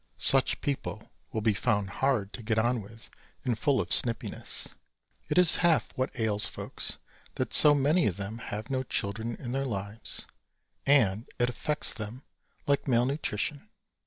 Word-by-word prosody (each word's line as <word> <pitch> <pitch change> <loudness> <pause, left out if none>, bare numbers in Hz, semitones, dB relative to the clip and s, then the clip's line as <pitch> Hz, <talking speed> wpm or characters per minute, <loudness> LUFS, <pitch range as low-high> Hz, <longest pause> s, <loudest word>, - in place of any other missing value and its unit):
Such 135 -1 +2
people 140 -2 -4 0.2
will 110 - -2
be 110 0 +2
found 100 0 0
hard 115 -8 +1
to 110 - -7
get 110 0 -1
on 120 +1 +1
with 110 +3 -13 0.4
and 125 -3 +1
full 135 +4 +1
of - - -2
snippiness. 115 -2 0 0.6
It 150 - 0
is 180 -2 +6
half 170 -3 +2
what 130 0 -1
ails 105 -2 +4
folks, - - -4 0.4
that - - -2
so 150 -1 +9
many 150 +5 +3
of 95 -3 -2
them 100 +3 -6
have 110 +2 -6
no 130 -1 0
children 110 -1 -2
in 120 - -7
their 135 +2 -1
lives 100 -2 -4 0.6
and 115 -6 +3
it 120 0 +1
affects 150 +4 0
them 115 +5 -7 0.4
like 140 0 +1
malnutrition. 130 +1 -1
120 Hz, 160 wpm, -28 LUFS, 105-135 Hz, 0.6 s, so